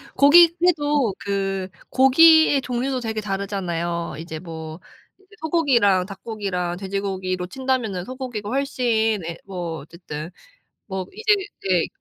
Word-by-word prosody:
고기 335 +4 +7
해도 290 - +2
그 195 -1 -2 0.2
고기의 290 +2 +6
종류도 255 +1 -2
되게 220 -2 -3
다르잖아요. 180 -5 -3
이제 160 -1 -7
뭐 160 -1 -8 0.4
이제 390 +2 -22
소고기랑 250 - +3
닭고기랑 195 -3 -4
돼지고기로 190 -2 -3
친다면은 235 -5 -2
소고기가 255 -5 -6
훨씬 235 -6 0
예 170 0 -5
뭐 175 -4 -5
어쨌든 155 +1 -8 0.6
뭐 190 -2 -4
이제 435 -1 +3 0.3
네 180 -3 +3
200 Hz, 275 characters per minute, -22 LUFS, 180-265 Hz, 0.6 s, 고기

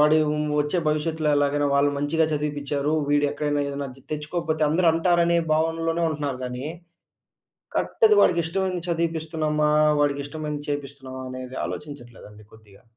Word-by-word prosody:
వాడు 150 +1 +6
హ్మ్, 150 0 -1
వచ్చే 150 +5 0
భవిష్యత్తులో 155 +1 0
ఎలాగైనా 145 0 +2
వాళ్ళు 140 +1 +3
మంచిగా 145 +3 +1
చదివిపిచ్చా‌రు. 145 -1 -1 0.2
వీడు 145 0 +3
ఎక్కడైనా 145 0 -1
ఏదైనా 140 0 -4
ద్ 135 - -18
తెచ్చుకోకపోతే, 155 +1 -2
అందరూ 170 +3 +2
అంటారనే 170 0 +3 0.2
భావనలోనే 165 +1 0
ఉంటున్నారు 145 -4 -3
గానీ. 125 +1 -5 1.1
కరెక్ట్‌ది 435 -3 +3
వాడికి 170 -1 +4
ఇష్టమైనది 180 0 -2
చదివిపిస్తున్నామా? 160 -2 0 0.3
వాడికి 145 -1 +1
ఇష్టమైనది 150 0 -5
చేపిస్తున్నామా? 140 -2 -5
అనేది 130 0 -7
ఆలోచించట్లేదండి 120 -7 -9
కొద్దిగా. 105 -3 -19
150 Hz, 130 wpm, -24 LUFS, 140-160 Hz, 1.1 s, వాడు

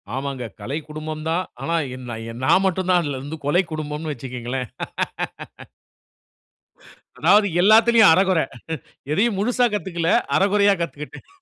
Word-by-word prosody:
ஆமாங்க 135 -2 -4 0.2
"கலை 130 +8 -3
குடும்பம்" 155 0 -6
தான். 170 +3 0 0.2
ஆனா 165 +5 -1 0.2
எநா 125 -3 -7 0.3
நான் 185 +8 +4
மட்டும் 185 0 0
தான் 180 - +5
அதிலிருந்து 145 +2 -5
"கொலை 175 +6 +3
குடும்பம்னு" 155 0 -4
வச்சுக்கோங்களேன். 125 -1 -5 2.5
அதாவது 200 +9 +5
எல்லாத்திலுயும் 220 0 +6
அரைகுறை. 185 -2 +3 0.7
எதையும் 200 +6 +1
முழுசா 245 +4 +2
கத்துக்கல, 175 -5 -2 0.3
அரைகுறையா 200 +1 +4
கத்துக்கிட்டேன். 150 -2 -6
160 Hz, 110 wpm, -22 LUFS, 140-195 Hz, 2.5 s, எல்லாத்திலுயும்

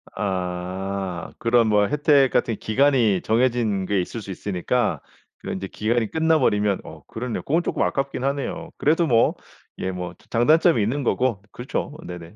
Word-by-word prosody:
아. 95 -1 -3
그런 115 -1 +3
뭐 105 -1 +3
혜택 145 -3 +3
같은 115 - +1
기간이 120 -5 +2
정해진 115 -4 +1
게 100 -1 +1
있을 110 +5 -6
수 100 - -8
있으니까 105 +5 -1 0.4
그런 - - -5
인제 95 +1 -5
기간이 110 +2 -1
끝나버리면 130 -12 +2
어 - - -12
그렇네요. 115 0 -4
그건 165 +5 +1
조금 - - -1
아깝긴 135 -2 -2
하네요. 145 +5 -2
그래도 160 +3 +2
뭐 115 -3 +3 0.4
예 95 - -2
뭐 90 -1 -5
자 - - -24
장단점이 155 +4 +4
있는 130 +8 -1
거고 125 -4 0
그렇죠. 130 +4 -4
네네. 90 +2 -9
115 Hz, 335 characters per minute, -23 LUFS, 95-135 Hz, 0.4 s, 장단점이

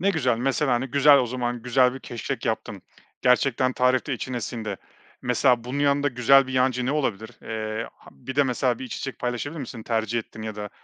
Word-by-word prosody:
Ne 195 +3 +3
güzel. 130 -9 +1
Mesela, 135 +2 +1
hani, 120 +2 0
güzel 140 +2 +6
o 125 - +1
zaman, 120 -1 -3
güzel 125 0 +3
bir 135 - -8
keşkek 120 -3 -5
yaptın, - - -3 0.4
gerçekten 130 0 +3
tarifte 125 +2 +1
içine 125 0 -3
sindi. 110 -3 -4 0.5
Mesela, 125 -1 +2
bunun 130 +3 -4
yanında 145 0 +2
güzel 135 +1 +5
bir 130 - -6
yancı 130 -1 +1
ne 140 - +1
olabilir? 110 -8 -2
Eee, 110 0 -4
ha - - -19
bir 130 +2 -9
de 145 - +6
mesela 125 -2 0
bir - - -6
içecek 130 +2 -6
paylaşabilir 125 +6 -3
misin? 125 -3 -7
Tercih 115 +1 -1
ettiğin 110 -1 -8
ya 110 -1 -5
da 105 -1 -6
125 Hz, 200 wpm, -25 LUFS, 120-135 Hz, 0.5 s, güzel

